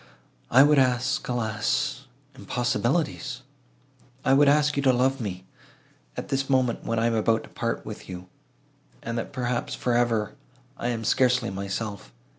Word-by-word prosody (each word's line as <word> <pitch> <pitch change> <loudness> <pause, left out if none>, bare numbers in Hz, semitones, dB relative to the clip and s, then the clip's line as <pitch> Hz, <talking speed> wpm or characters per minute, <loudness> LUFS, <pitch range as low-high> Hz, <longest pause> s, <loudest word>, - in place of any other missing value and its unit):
I 130 +3 +7
would 145 0 +5
ask, 125 0 +1
alas! 110 -4 -1 0.3
impossibilities: 125 +2 -1 0.8
I 135 - +4
would 145 +1 +5
ask 150 0 +3
you 140 - +1
to 135 -1 +4
love 130 +1 +1
me! 95 -4 -5 0.7
At - - -5
this 135 0 -1
moment, 130 -3 +1
when 115 - -2
I 115 - +2
am 115 - +2
about 110 0 +1
to - - -13
part - - -3
with - - -8
you, 90 0 -8 0.8
and 115 - -4
that, - - -5
perhaps, 125 -2 -2
for 125 - -1
ever, 115 -3 +1 0.4
I 120 - -4
am 115 -2 -2
scarcely 125 -1 +2
myself. 100 - -5
120 Hz, 155 wpm, -26 LUFS, 110-130 Hz, 0.8 s, I